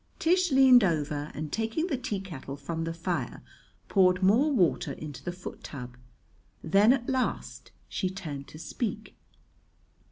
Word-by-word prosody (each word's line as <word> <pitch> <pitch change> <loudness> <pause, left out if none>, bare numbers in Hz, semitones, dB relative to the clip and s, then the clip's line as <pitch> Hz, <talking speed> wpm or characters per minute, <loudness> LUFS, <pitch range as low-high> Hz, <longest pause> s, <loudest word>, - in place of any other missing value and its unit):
Tish 360 0 +2
leaned 260 -3 +7
over 150 -4 -1
and, 150 -1 -5
taking 225 +9 -1
the 340 -6 -1
teakettle 190 - -5
from 165 +3 -4
the 165 - -3
fire, 170 +1 -3 0.4
poured 185 -1 +3
more 235 +11 +4
water 185 - +2
into 150 -3 -8
the 175 - -3
foot 180 +1 -9
tub. 125 -3 -8 0.7
Then 200 +7 +5
at 255 -2 0
last 260 -2 -2 0.2
she 185 - -2
turned 155 -8 -6
to - - -12
speak. 210 +6 -4
185 Hz, 140 wpm, -28 LUFS, 155-245 Hz, 0.7 s, leaned